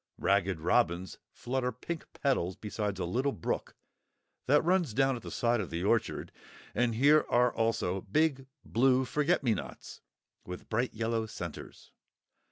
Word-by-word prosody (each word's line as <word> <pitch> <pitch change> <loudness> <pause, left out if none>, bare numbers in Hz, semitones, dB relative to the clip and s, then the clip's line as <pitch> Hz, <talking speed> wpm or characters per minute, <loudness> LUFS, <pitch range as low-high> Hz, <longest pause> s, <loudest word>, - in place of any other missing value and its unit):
Ragged 95 -3 +1
Robins 85 +2 +1
flutter 125 0 -2
pink 155 +7 -7
petals 95 -11 0
beside 105 -1 -3
a 95 - -2
little 130 +11 0
brook 85 - -3 0.7
that 145 +3 +5
runs 175 - +1
down 135 0 +3
at 120 - -7
the - - -8
side 120 -1 +1
of 90 - -5
the 85 +1 -3
orchard; 110 +3 0 0.4
and 120 -2 +1
here 145 +6 +5
are 120 0 +3
also 115 -5 0
big 135 - +1 0.2
blue 130 +2 +3
forget 150 +5 +1
me 120 -4 +3
nots, - - -7 0.4
with 90 0 -9
bright 120 +2 -1
yellow 115 0 -1
centres. 85 -6 -8
115 Hz, 150 wpm, -31 LUFS, 100-135 Hz, 0.7 s, that